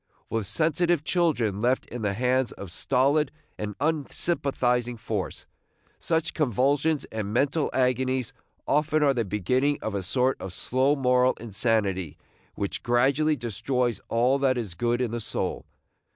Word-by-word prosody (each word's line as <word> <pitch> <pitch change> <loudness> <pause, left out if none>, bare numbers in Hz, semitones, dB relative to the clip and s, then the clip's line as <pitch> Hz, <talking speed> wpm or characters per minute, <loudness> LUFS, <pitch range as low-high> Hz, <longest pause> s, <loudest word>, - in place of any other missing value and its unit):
With 110 -3 -1
sensitive 160 - +1
children 135 - +1
left 125 +3 +1
in 120 - -7
the 105 -2 0
hands 125 +2 +1
of 100 -3 -9
stolid 135 - +2 0.3
and 105 -1 -4
unsympathizing 135 -5 0
force, - - -4 0.5
such 160 -1 0
convulsions 145 - +1
and 105 -2 -3
mental 140 +6 +1
agonies 130 -1 0 0.3
often 150 +1 +2
are 140 -2 +4
the 120 -3 0
beginning 125 +9 +1
of 110 - -2
a 100 - -1
sort 125 +7 0
of 95 -2 -6
slow 130 +8 +1
moral 125 -2 +3
insanity 100 -7 -1 0.4
which 100 - -3
gradually 135 +6 +2
destroys 120 0 -1
all 125 +4 +2
that 130 -2 +2
is 110 -7 -4
good 120 +7 0
in 120 -3 -1
the 120 0 -3
soul. - - -3
125 Hz, 140 wpm, -26 LUFS, 110-140 Hz, 0.5 s, are